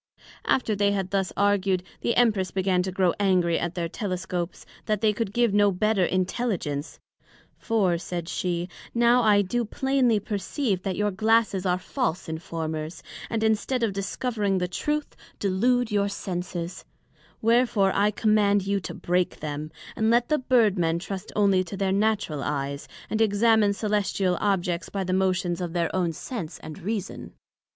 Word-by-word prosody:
After 225 -5 +1
they 200 0 +2
had 190 -2 -2
thus 195 -2 0
argued, 195 -2 +2 0.2
the 235 - 0
Empress 215 -6 +3
began 185 0 +1
to 185 +1 -3
grow 185 -2 +2
angry 180 -4 +2
at 175 +1 -3
their 170 -2 -1
Telescopes, 185 -2 -4 0.2
that 215 -2 +1
they 215 0 +3
could 210 -2 -2
give 235 -1 +2
no 205 0 +4
better 210 +1 +1
Intelligence; 185 -6 -2 0.6
for, 195 -7 +1
said 175 -2 -5
she, 175 -1 -2 0.3
now 240 +1 +5
I 210 -3 +4
do 240 +6 -1
plainly 255 -1 +1
perceive, 205 - -2
that 190 -1 -2
your 210 0 0
Glasses 215 -1 +2
are 180 0 +2
false 185 - -2
Informers, 160 0 -5 0.3
and 225 -1 -1
instead 220 +3 +1
of 215 -4 +1
discovering 200 0 -1
the 180 -1 0
Truth, 295 +11 -2 0.2
delude 235 +5 +1
your 200 -1 +1
Senses; 180 -3 -5 0.6
Wherefore 230 -4 +3
I 205 +1 +3
Command 210 -2 +2
you 200 0 +1
to 170 - -7
break 180 0 0
them, 150 0 -4 0.3
and 220 -1 +1
let 240 +1 +3
the 305 - +2
Bird 235 -7 +3
men 165 -1 +1
trust 190 +2 -6
onely 195 -3 +3
to 195 - -7
their 195 -1 0
natural 200 -7 0
eyes, 140 0 -3 0.2
and 220 - -1
examine 220 0 +4
Cœlestial 200 -3 0
Objects 180 -4 0
by 195 -1 -2
the 185 0 -2
motions 185 -2 +1
of 175 -2 -3
their 170 0 -1
own 180 -3 +1
Sense 170 0 -6
and 155 - -8
Reason. 205 0 -4
195 Hz, 160 wpm, -26 LUFS, 180-220 Hz, 0.6 s, now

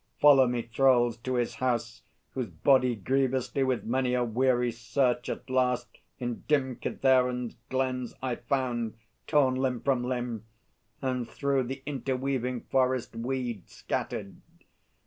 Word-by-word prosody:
Follow 140 -3 +7
me, 120 -1 -1
Thralls, 120 -1 +3
to 130 +2 -3
his 120 -1 0
house, 120 -3 -1 0.3
whose 125 -5 -3
body 125 - +3
grievously 130 +4 0
With 130 -2 0
many 125 +1 0
a 125 - +2
weary 120 +1 +2
search 120 +2 0
at - - -5
last 125 -1 0 0.2
in 120 -2 -4
dim 130 -5 +1
Kithaeron's 125 -2 +1
glens 130 -2 -1
I 125 -2 -2
found, 120 -5 -1 0.3
torn 140 -4 +4
limb 130 -1 0
from 130 -3 +1
limb, 120 -3 -3 0.6
And 125 -3 -1
through 140 -2 0
the 135 +2 -6
interweaving 130 -2 -2
forest 130 -3 0
weed 120 -3 -3
Scattered. - - -4
125 Hz, 130 wpm, -29 LUFS, 120-130 Hz, 0.6 s, Follow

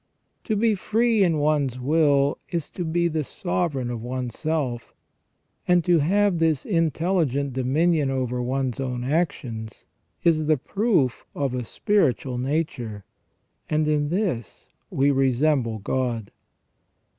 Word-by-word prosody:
To 220 - 0
be 220 +1 +3
free 225 +2 +1
in 170 -5 +3
one's 145 -4 +1
will 145 0 +2
is 170 -4 -3
to 180 - -4
be 170 +1 +1
the 160 -2 -1
sovereign 145 -6 -2
of 120 -2 -5
one's 125 0 -4
self; 145 -7 -2 0.7
and 180 -1 +4
to 175 0 +4
have 190 +3 +2
this 160 -4 +1
intelli 165 -1 +1
gent 140 +1 -2
dominion 145 +4 +1
over 125 -2 -1
one's 130 0 -2
own 125 -2 -3
actions 125 -7 -2 0.4
is 155 -2 +3
the 155 -1 +4
proof 185 - 0
of 140 -3 -1
a 125 -1 -2
spiritual 130 - 0
nature, 125 -7 -3 0.6
and 155 0 +1
in 150 -1 +1
this 170 - -3 0.2
we 140 +1 +2
resemble 135 -3 +1
God. 115 0 -2
145 Hz, 135 wpm, -24 LUFS, 125-165 Hz, 0.7 s, and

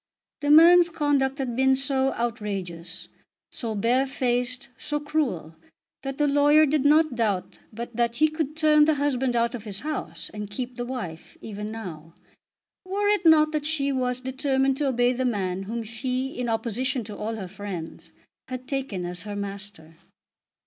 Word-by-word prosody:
The 290 - -1
man's 340 +3 +8
conduct 290 -4 +1
had 255 -4 -3
been 265 +1 +4
so 270 0 +1
outrageous, 200 -8 -4 0.4
so 225 -3 -4
bare 245 +6 +2
faced, 255 0 -1
so 295 +4 -3
cruel, 290 - -2 0.5
that 270 -1 -5
the 295 - +2
lawyer 290 +2 +5
did 295 -1 +1
not 310 0 +5
doubt 215 -6 -1
but 235 +1 -7
that 235 0 +1
he 310 +5 +4
could 310 -1 -3
turn 305 -1 +5
the 310 0 +3
husband 265 -3 0
out 235 0 +1
of 230 -3 -6
his 200 -1 -3
house, 305 +1 -4
and 210 -1 -6
keep 250 +3 -5
the 240 0 -4
wife, 180 -11 -6
even 210 -1 -6
now, 170 -8 -8 0.7
were 400 +2 0
it 410 -5 +2
not 310 -1 +6
that 305 -2 -1
she 285 -3 +1
was 250 -1 -1
determined 265 +1 +1
to 290 -1 0
obey 245 -1 +2
the 255 +1 -2
man 195 -6 -1
whom 230 0 -3
she, 255 +4 -3
in 250 -3 -3
opposition 235 +3 -1
to 210 -1 -8
all 220 +2 -3
her 195 -4 -6
friends, 175 -4 -7 0.4
had 255 0 -6
taken 260 -10 -3
as 175 0 -5
her 205 +2 -6
master. 200 -5 -7
250 Hz, 170 wpm, -25 LUFS, 210-285 Hz, 0.7 s, man's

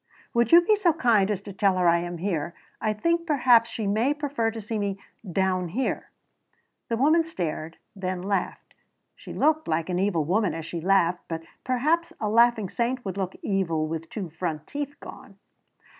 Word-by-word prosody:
"Would 235 -1 +2
you 340 - +9
be 425 +5 +3
so 380 -5 +2
kind 230 -10 +3
as 200 -3 -1
to 200 -1 -9
tell 195 -1 +2
her 180 -1 +3
I 170 0 +5
am 175 0 -5
here? 170 -2 -2 0.3
I 215 - +1
think 335 +10 0
perhaps 245 -6 +4
she 220 - -4
may 225 +8 +1
prefer 285 -6 -1
to 225 0 -6
see 215 +1 -4
me 200 -1 -2 0.3
down 185 0 +1
here." 240 +11 -2 0.8
The 230 - 0
woman 310 +6 +4
stared, 165 - -4 0.2
then 185 -2 -3
laughed. 195 -1 -3 0.4
She - - -11
looked 310 +1 +1
like 160 +2 -1
an 180 0 0
evil 185 -5 +1
woman 185 0 +1
as 165 -1 -6
she 170 0 -5
laughed, 180 -1 +2
but 165 -1 -4 0.2
perhaps 315 +7 +1
a 210 - -1
laughing 230 -1 +4
saint 240 +5 -2
would 190 -2 -3
look 190 -1 -3
evil 165 -6 0
with 165 0 -5
two 190 -7 -5
front 160 -2 -4
teeth 285 0 -5
gone. - - -12
200 Hz, 190 wpm, -26 LUFS, 175-250 Hz, 0.8 s, you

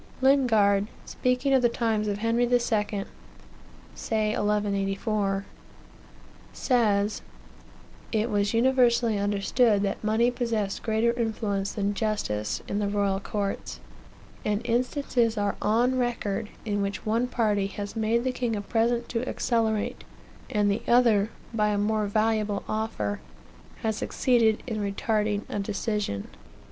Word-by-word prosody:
Lingard, 220 -7 +4 0.2
speaking 250 +2 0
of 265 - +5
the 240 - +4
times 225 -3 0
of 205 -1 -1
Henry 230 +3 +1
II., 245 0 +3 1.4
(say 215 -1 -1
1184,) 205 -1 0 1.1
says: 210 -5 +1 0.9
"It 220 +1 0
was 205 0 +1
universally 235 -3 +3
understood 205 +2 +2
that 200 +1 -2
money 225 +3 +2
possessed 230 -5 -2
greater 225 +1 +1
influence 215 -4 -2
than 205 0 -1
justice 200 - -2
in 205 - -1
the 205 - 0
royal 200 -1 +1
courts, 200 - -4 0.6
and 210 0 0
instances 240 -1 +1
are 205 -1 0
on 245 +5 +2
record, 225 -4 -2 0.2
in 205 -2 -1
which 200 0 -3
one 230 +3 +1
party 210 -5 +1
has 200 +1 -6
made 225 +2 +1
the 260 - 0
king 245 -3 -2
a 205 - -2
present 235 +3 0
to 245 +2 -2
accelerate, 220 -3 0 0.5
and 205 -1 +2
the 200 - -1
other 230 -4 +4 0.2
by 210 -2 +2
a 210 -1 +1
more 210 +1 +1
valuable 215 -1 0
offer 105 - -2 0.6
has 220 -1 0
succeeded 230 -4 +2
in 225 -4 -3
retarding 210 +1 0
a 205 - -3
decision. 200 - -2
215 Hz, 130 wpm, -27 LUFS, 205-235 Hz, 1.4 s, of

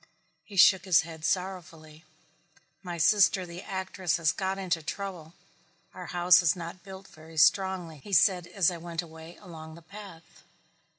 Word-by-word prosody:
He 205 - -13
shook 190 0 +6
his 185 -4 +4
head 160 -1 -11
sorrowfully. 165 -4 -4 0.8
"My 175 -2 -6
sister 190 +2 +3
the 175 +1 -9
actress 190 -3 -3
has 165 -2 +1
got 190 0 -3
into 175 -4 -2
trouble. 175 -1 -7 0.6
Our 180 -1 -9
house 175 0 +4
is 170 0 +2
not 170 +1 -8
built 190 +1 -12
very 160 +1 -15
strongly," 175 0 +2
he 200 - -13
said 180 -2 +3
as 185 -2 +1
I 175 - -6
went 170 0 -5
away 160 +1 -13
along 160 -4 -11
the 170 - -15
path. 195 -2 -13
175 Hz, 160 wpm, -28 LUFS, 165-190 Hz, 0.8 s, shook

